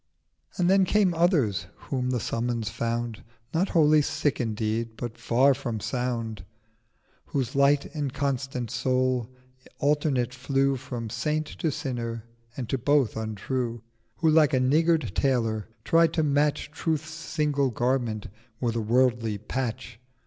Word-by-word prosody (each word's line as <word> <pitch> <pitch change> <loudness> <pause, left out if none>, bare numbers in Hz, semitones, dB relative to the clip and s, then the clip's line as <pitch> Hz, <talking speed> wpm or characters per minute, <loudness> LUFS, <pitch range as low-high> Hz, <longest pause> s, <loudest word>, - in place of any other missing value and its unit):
720 - - -15
And 175 - +3
then 190 0 +4
came 205 -4 +4
others 145 - +2
whom 125 -2 -3
the 125 -1 0
summons 115 -1 -2
found 115 -1 -3 0.3
Not 175 +4 +1
wholly 155 -3 +5
sick 145 -1 0
indeed, 110 0 -2
but 120 -2 -5
far 130 +4 +3
from 120 -5 -4
sound: 115 -4 -3 0.8
Whose 135 -2 -2
light 140 +1 +4
inconstant 135 -4 -2
Soul 130 -2 0 0.5
alternate 140 -4 +1
flew 135 +1 +1
From 120 -3 -6
Saint 150 +6 -1
to 155 +1 -2
Sinner, 115 -5 -4 0.3
and 125 -4 -3
to 135 - 0
both 140 -1 +2
untrue; 115 +2 -3 0.3
Who 160 - +2
like 155 -3 +5
a - - +3
niggard 155 - +2
Tailor, 115 -6 0 0.2
tried 165 +5 +4
to 160 - +1
match 145 0 +1
Truth's 155 0 -2
single 150 -4 0
Garment 120 -3 -1 0.3
with 120 -2 -1
a 115 - 0
worldly 115 -1 +2
Patch. 115 +1 -4
130 Hz, 135 wpm, -26 LUFS, 115-150 Hz, 0.8 s, wholly